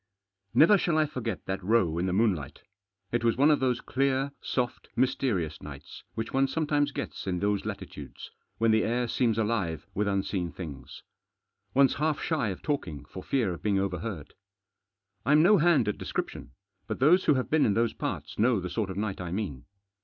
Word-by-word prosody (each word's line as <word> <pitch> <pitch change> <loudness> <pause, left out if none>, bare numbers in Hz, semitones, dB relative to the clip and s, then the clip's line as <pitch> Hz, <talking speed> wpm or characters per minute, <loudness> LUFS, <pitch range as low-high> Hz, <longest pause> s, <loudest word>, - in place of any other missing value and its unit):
NEVER 195 +6 +7
shall 170 -3 +1
I 155 - +4
forget 115 - -4
that 95 0 -3
row 90 -6 +2
in 90 - 0
the - - 0
moonlight. 95 - 0 0.5
It 120 0 0
was 115 -1 +2
one 145 +3 +5
of 150 - +3
those 125 -2 +1
clear, 135 +1 0
soft, 125 -2 -2
mysterious 120 - 0
nights, 70 -1 -10
which 115 - -4
one 135 +1 +3
sometimes 145 -1 0
gets 135 - -5
in 90 -1 0
those 100 +1 0
latitudes, - - -8 0.3
when 115 0 +3
the 110 0 +3
air 120 +1 0
seems 115 -1 +1
alive 105 -8 -1
with 105 +1 0
unseen 95 -3 -1
things. 70 -8 -9 0.7
One's 135 -1 +5
half 155 -1 +1
shy 155 -8 0
of 95 - -6
talking 90 - -3
for - - -9
fear 115 -9 0
of 85 - -9
being 100 -2 +1
overheard. 95 -3 -3 0.9
I'm 150 +5 +5
no 200 +2 +6
hand 160 -8 +4
at 105 - -2
description, - - -4 0.3
but - - -3
those 165 +8 +4
who 150 - +5
have 130 - -2
been 155 -1 +4
in 100 - +1
those 115 0 +1
parts - - -5
know 115 0 +3
the 90 -1 -5
sort 100 +2 -1
of 95 - -5
night 100 -3 -2
I 90 -2 -5
mean. 90 - -4
115 Hz, 190 wpm, -28 LUFS, 95-135 Hz, 0.9 s, NEVER